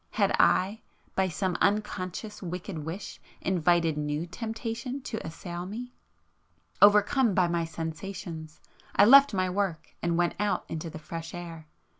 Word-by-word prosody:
—had - - +2
I, 200 +5 +3 0.3
by 190 0 +2
some 180 +3 -1
unconscious 205 0 -1
wicked 180 -1 -5
wish 165 +6 -6 0.2
invited 170 -3 +2
new 150 +2 -2
temptation 225 +6 -4
to 220 - -5
assail 175 +2 -6
me? 245 +5 -7 0.9
Overcome 210 +2 +5
by 180 -2 +4
my 170 -1 0
sensations, 165 0 -6 0.4
I 200 - +7
left 275 +4 +8
my 185 -3 +1
work 185 -3 -2
and 170 -1 0
went 175 0 +2
out 210 0 0
into 165 +1 -5
the 160 - -8
fresh 165 +2 -7
air 165 -3 -8
180 Hz, 140 wpm, -28 LUFS, 165-210 Hz, 0.9 s, left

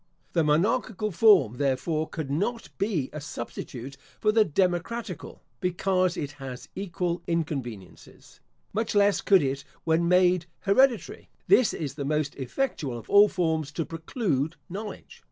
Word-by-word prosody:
The 165 - +3
monarchical 210 +6 +1
form, 180 - +5
therefore, 145 +4 0
could 155 -5 -5
not 215 +10 -2
be 190 -9 -1
a 150 - -5
substitute 130 0 -7 0.2
for 215 - +3
the 220 0 +5
democratical, 180 +2 -2 0.2
because 185 0 +1
it 145 -1 -3
has 130 -2 -7
equal 180 -2 -2
inconveniences. 135 - -5 0.3
Much 220 +1 -1
less 205 0 +4
could 190 -6 +5
it 135 +1 -2 0.2
when 165 +1 +2
made 180 -1 +4
hereditary. 240 +4 +2 0.2
This 255 - +5
is 145 -5 -4
the 140 0 -5
most 150 0 -1
effectual 140 - -3
of 115 - -11
all 205 +1 +8
forms 160 -5 -1
to 165 - -2
preclude 165 - -2
knowledge. 205 +3 -8
170 Hz, 135 wpm, -27 LUFS, 145-200 Hz, 0.3 s, all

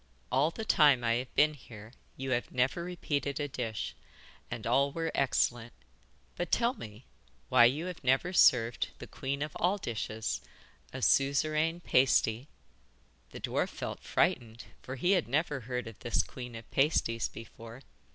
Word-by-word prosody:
All 135 +5 +3
the 220 +6 -6
time 145 - +5
I 115 0 +2
have 125 +1 -6
been 150 +1 +5
here 115 -5 -13 0.2
you 135 0 -4
have 120 -1 -1
never 130 +7 0
repeated 145 -5 -2
a 145 - -1
dish, 115 -6 -4 0.6
and 120 -2 -6
all 135 +4 +3
were 165 +2 -2
excellent. 120 -3 0 0.6
But 175 - -4
tell 240 +1 +3
me 110 - -11 0.4
why 120 - +7
you 145 +8 +1
have 180 -4 -7
never 135 +8 +2
served 120 -8 +4
the - - -8
queen 140 +2 -3
of 150 - -7
all 185 +4 +2
dishes, 110 - -3 0.5
a 130 -1 -6
Suzeraine 155 +4 +2
Pasty?' 125 -3 +2 0.8
The - - -9
dwarf - - -1
felt - - -6
frightened, 115 -1 0 0.2
for 130 - -6
he 175 +8 +1
had 180 -4 +2
never 145 +2 0
heard 125 -1 -4
of 115 -2 -10
this 120 - +1
Queen 125 -2 -9
of 115 -1 -11
Pasties 125 -6 +1
before. 115 +2 -11
130 Hz, 160 wpm, -31 LUFS, 120-150 Hz, 0.8 s, why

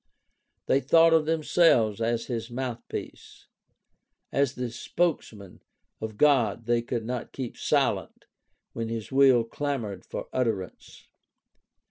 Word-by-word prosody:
They 135 - +3
thought 165 +2 +5
of 160 -1 +3
themselves 155 - +3
as 115 0 0
his 115 -2 -4
mouthpiece. 120 -1 -7 0.9
As 140 -2 +1
the 125 -2 -4
spokesmen 115 - -3 0.4
of 110 -1 -5
God 120 -6 +3
they 120 0 +2
could 120 -1 -4
not 125 0 -4
keep 130 -3 -5
silent - - -1 0.5
when 115 -1 -4
his 115 0 -5
will 130 -3 +5
clamored 115 -6 -4
for - - -7
utterance. 110 -8 -3
120 Hz, 115 wpm, -27 LUFS, 115-140 Hz, 0.9 s, thought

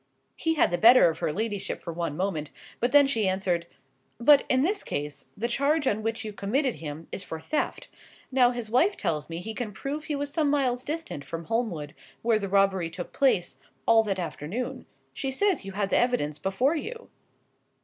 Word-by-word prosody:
He 325 0 0
had 295 - +3
the 175 - 0
better 235 -4 +8
of - - -10
her - - 0
ladyship 205 +2 -3
for 170 - -5
one 165 -3 -3
moment; 175 -5 -2 0.3
but 240 +1 +1
then 285 -1 +7
she 225 -7 +1
answered— 185 -3 0 0.5
"But 280 +4 +6
in 260 +1 +3
this 395 +5 0
case, 145 -1 -4
the 230 +3 -1
charge 280 +5 +1
on 215 -4 +1
which 225 0 -3
you 215 - -5
committed 250 +7 0
him 155 +1 -6
is - - -4
for 160 -3 -6
theft; 300 - -2 0.4
now 255 -2 +5
his 240 -2 -4
wife 335 - +3
tells 155 -5 -2
me 165 - -4
he 220 +4 -5
can 220 -1 -4
prove 280 +8 -5
he 300 - -2
was 285 0 -3
some 305 -2 +2
miles 255 -4 +1
distant 310 - -4
from 165 +2 -6
Holmwood, 205 -11 -2 0.3
where 225 -2 +3
the 200 -2 -4
robbery 195 -3 +2
took 175 +1 -7
place, 180 - +1 0.3
all 225 -1 +6
that 195 -2 -1
afternoon; 230 - -4 0.3
she 270 - -3
says 350 - +1
you 195 - -6
had 195 0 -1
the - - +4
evidence 240 -12 +1
before 245 +11 +1
you." 460 +9 -6
225 Hz, 200 wpm, -27 LUFS, 175-270 Hz, 0.5 s, better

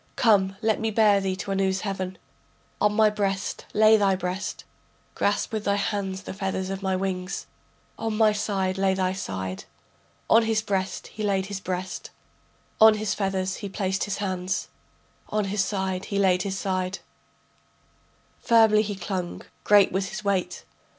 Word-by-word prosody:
Come, 195 -5 +3
let 220 -1 +2
me 225 - 0
bear 210 -2 +4
thee 190 -1 -1
to 185 +1 -5
Anu's 190 0 +1
heaven, 190 -2 -4 0.6
On 210 - +4
my 215 0 +4
breast 195 -2 -2
lay 215 +1 +6
thy 200 -2 +3
breast, 185 +1 -4 0.5
Grasp 205 +2 0
with 215 -1 -2
thy 200 - +2
hands 200 -2 -2
the - - -6
feathers 190 0 -3
of 195 0 -4
my 190 -1 0
wings. 185 0 -3 0.5
On 225 -1 -2
my 215 -1 +5
side 195 -3 -1
lay 190 -1 +2
thy 185 -1 0
side. 95 - -5 0.6
On 225 - +6
his 220 -1 0
breast 195 -3 -2
he 215 - -9
laid 195 -2 +1
his 200 -1 -5
breast, 185 0 -4 0.7
On 220 0 +8
his 215 -2 -1
feathers 190 -2 -1
he 200 - -6
placed 190 -1 -1
his 205 - -3
hands, 185 -2 -2 0.6
On 215 -1 0
his 195 +1 0
side 190 -1 -3
laid 190 -2 +3
his 195 0 -3
side, 185 -1 -2 1.4
Firmly 225 -2 +5
he 205 -1 -3
clung, 180 -1 -4 0.2
great 205 -2 +5
was 190 +1 -1
his 215 0 -6
weight. 200 -3 -1
195 Hz, 160 wpm, -25 LUFS, 190-210 Hz, 1.4 s, On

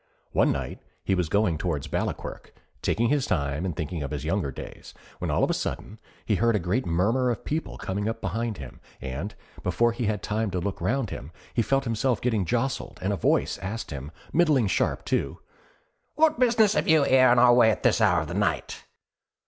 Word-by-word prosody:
One - - +3
night - - -4 0.2
he 95 - 0
was 90 -4 0
going 100 -6 +1
towards 80 -6 -2
Ballaquirk, - - -4 0.3
taking 115 +2 +1
his 145 -2 +1
time 70 -1 -1
and 90 -4 -3
thinking 80 +1 -4
of 70 - -3
his 75 -1 -4
younger 85 -2 0
days, - - -10 0.2
when - - -3
all - - +1
of - - +2
a - - +1
sudden 105 +2 -4 0.3
he 110 - +1
heard 115 +1 +3
a - - +2
great 95 +8 -1
murmur 110 +10 +2
of 120 - -3
people 160 +2 -3
coming 100 +3 -2
up 115 0 -4
behind 115 +2 -2
him, 65 -4 -10 0.2
and, 70 +10 -5 0.3
before 120 0 +2
he 115 0 -3
had 105 -1 -1
time 110 0 -1
to 90 -1 -2
look 95 +1 -4
round 115 +3 0
him, 70 - -7 0.2
he 120 - +2
felt 135 +4 +1
himself 115 0 0
getting 110 -6 0
jostled 125 +9 -2
and 100 +2 +1
a - - +1
voice 95 - +1
asked 100 +2 -5
him 70 0 -6 0.2
middling 155 -8 +4
sharp, 95 - 0
too: - - -1 0.8
'What 310 -3 +3
business 230 -4 +4
have - - 0
you 160 -2 +5
here 130 -1 +5
in 125 - +4
our 120 0 +7
way 120 -2 +6
at 110 - -1
this - - +3
hour 90 -6 +4
of 75 - -5
the 85 - -5
night?' 105 +2 -1
105 Hz, 210 wpm, -26 LUFS, 90-125 Hz, 0.8 s, our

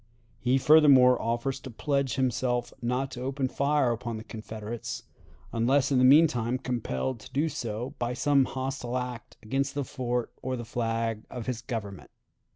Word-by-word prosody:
He 130 +1 +2
furthermore 135 -4 +6
offers 120 +4 -1
to 130 - -9
pledge 140 0 -1
himself 125 -2 0
not 125 +3 -1
to 125 - -7
open 135 +1 -1
fire 140 -2 +2
upon 120 -1 -3
the 110 - -7
Confederates, 110 0 -6 0.5
unless 130 +4 +2
in 130 - +4
the - - +4
mean 145 +6 +8
time 120 -4 -1
compelled 120 - -3
to - - -13
do 145 +4 +2
so 125 -3 -4
by 120 0 -1
some 140 0 +3
hostile 130 -1 -3
act 125 -1 -6
against 135 +5 -1
the 145 -2 -1
fort 125 -2 -2
or 130 0 -2
the 120 - -6
flag 115 -1 -2
of 120 -3 -6
his 125 -2 -3
Government. 110 -6 -6
125 Hz, 165 wpm, -28 LUFS, 115-135 Hz, 0.5 s, mean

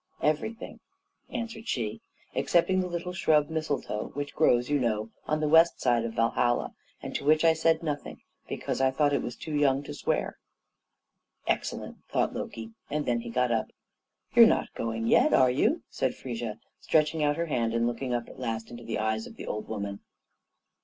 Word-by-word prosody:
"Everything," 155 +10 -1 0.5
answered 230 -1 -5
she, 110 -4 -2 0.3
"excepting 185 +2 +2
the 180 - -2
little 175 +1 -4
shrub 155 -4 +2
mistletoe, 150 -9 -2
which 145 0 -4
grows, 125 -6 +3
you 145 0 +2
know, 110 -3 -1 0.2
on 155 0 0
the 155 - +1
west 165 +2 +5
side 120 -2 +2
of 115 - -5
Valhalla, 120 +1 +1 0.3
and - - -5
to - - -3
which 155 +3 +4
I 165 - +7
said 160 +1 +2
nothing, 145 -3 -4 0.3
because - - -3
I 135 - +5
thought 145 +2 +2
it - - +2
was 120 - -5
too 155 - -7
young 140 -2 +2
to - - -7
swear." - - -2 1.1
"Excellent!" - - -2
thought - - 0
Loki, 115 0 -6 0.2
and 150 0 -1
then 120 -1 +1
he 115 0 -7
got 125 +1 +1
up. 110 -1 +1 0.7
"You're - - +9
not - - +1
going 115 0 -3
yet, - - +4
are 130 -1 +5
you?" 225 - +1
said 130 - -1
Frigga, 120 -4 -5 0.2
stretching 155 0 +2
out 145 0 +2
her 170 - 0
hand 115 -7 0
and 115 0 +2
looking 120 +2 -2
up 120 -1 -1
at - - -12
last 115 -2 -3
into 120 0 -9
the 115 -1 -3
eyes 110 +1 -1
of - - -12
the - - -8
old 105 - -4
woman. 100 -2 -4
135 Hz, 185 wpm, -28 LUFS, 115-155 Hz, 1.1 s, You're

